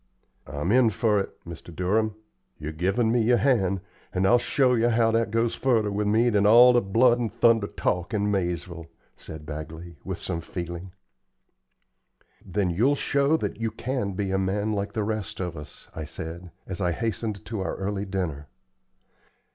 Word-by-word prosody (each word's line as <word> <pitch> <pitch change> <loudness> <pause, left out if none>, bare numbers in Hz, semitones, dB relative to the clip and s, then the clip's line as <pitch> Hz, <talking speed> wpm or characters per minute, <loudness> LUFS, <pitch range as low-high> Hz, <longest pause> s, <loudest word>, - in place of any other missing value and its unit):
"I'm 75 +6 -2
in 125 -1 +5
fer 105 0 +1
it, 95 - -6
Mr. 85 0 -9
Durham. 105 +5 0 0.4
You've 75 0 -7
given 100 +7 +1
me 120 0 +3
your 120 +2 +4
hand, 100 -8 +2 0.3
and 95 +1 0
I'll 120 +5 +5
show 130 +1 +2
yer 120 0 +3
how 115 -1 +3
that 115 -1 +1
goes 115 +1 +1
furder 115 -6 +1
with 105 +1 -1
me 115 +3 +3
than 100 -1 +3
all 120 +3 +8
the 120 - +4
blood 120 +5 +3
and 115 -3 -2
thunder 115 -3 +3
talk 90 -3 -2
in 105 -1 0
Maizeville," 85 -3 -3 0.3
said 80 -1 -10
Bagley, 80 +2 -8
with - - -4
some 85 - -4
feeling. 85 +2 -6 1.5
"Then 95 -1 -1
you'll 120 +12 +3
show 140 +2 +2
that 115 - -4
you 115 - 0
can 115 -2 -3
be 95 0 -2
a 95 - +1
man 100 +3 0
like 100 0 -3
the 110 - -1
rest 110 -1 -3
of 90 -2 -3
us," 75 -1 -11
I 80 - -5
said, 85 +4 -7 0.2
as 95 0 -6
I 90 -2 +1
hastened 110 0 -3
to 110 -2 -4
our 95 - -2
early 100 +1 -3
dinner. 85 -7 -3
100 Hz, 180 wpm, -26 LUFS, 90-115 Hz, 1.5 s, all